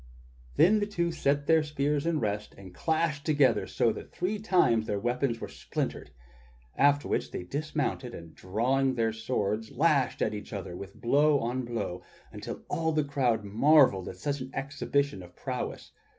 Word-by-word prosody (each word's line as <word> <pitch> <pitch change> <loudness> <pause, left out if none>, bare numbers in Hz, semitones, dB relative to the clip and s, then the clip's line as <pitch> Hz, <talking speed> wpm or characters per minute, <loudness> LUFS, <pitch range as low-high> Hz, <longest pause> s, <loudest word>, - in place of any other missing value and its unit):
Then 210 +5 +5
the 205 - -1
two 170 -4 -1
set 145 -3 0
their 160 +1 +5
spears 150 0 -1
in 165 -2 +1
rest 105 -1 -3
and 95 -2 -12
crashed 155 - 0
together 145 -6 +3
so - - +1
that - - -9
three 205 +4 -2
times 125 - +3
their 100 - -1
weapons 120 +1 -1
were - - -5
splintered, - - -4 0.7
after 145 +1 +3
which - - -1
they - - -5
dismounted 145 - -3
and 85 -1 -11
drawing 130 +7 0
their 115 -2 +1
swords 110 -1 -2
lashed 145 -2 +2
at - - 0
each 105 +2 -7
other 95 -3 -5
with 100 +1 -9
blow 145 +5 +4
on 125 0 -2
blow 110 -7 -4 0.3
until - - -7
all 160 -1 0
the 155 -1 +1
crowd 130 -6 0
marvelled 110 - +4
at 90 - -9
such 140 +8 -2
an 130 - -6
exhibition 140 -3 -1
of 90 0 -13
prowess. - - -5
135 Hz, 170 wpm, -29 LUFS, 110-150 Hz, 0.7 s, Then